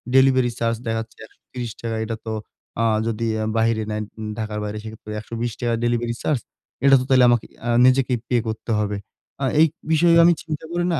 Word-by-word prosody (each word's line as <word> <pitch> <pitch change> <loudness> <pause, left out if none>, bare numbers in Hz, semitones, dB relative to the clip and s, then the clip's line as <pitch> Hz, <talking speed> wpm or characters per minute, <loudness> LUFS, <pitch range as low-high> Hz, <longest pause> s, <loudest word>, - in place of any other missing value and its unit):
Delivery 130 -2 +5
charge 115 0 +1
দেখাচ্ছে 115 0 -3
৳১৩০ 115 -1 -7
এটা 115 0 -3
তো 110 - -3 0.5
আ - - +3 0.2
যদি 115 0 -2 0.3
বাহিরে 115 -1 +2
নেয়, 105 0 -2 0.3
ঢাকার 105 -1 -3
বাইরে 105 0 -4
সেক্ষেত্রে 110 -1 -9
৳১২০ 115 +2 -3
ডেলিভারি 120 0 0
চার্জ। 145 -5 +1 0.5
এটা 135 0 +8
তো - - -1
তাহলে 130 -1 +6
আমাকে 120 -2 +2 0.2
আ - - 0 0.2
নিজেকেই 130 -1 +3
পে 125 - 0
করতে 110 +1 -4
হবে। 105 -1 -1 0.4
আ - - -1 0.2
এই 160 - +7 0.2
বিষয়ে 170 +1 +5
আমি 175 - +6
চিন্তা 155 -1 -5
করি 175 0 0
না, 160 - +1
115 Hz, 175 wpm, -22 LUFS, 110-130 Hz, 0.5 s, এটা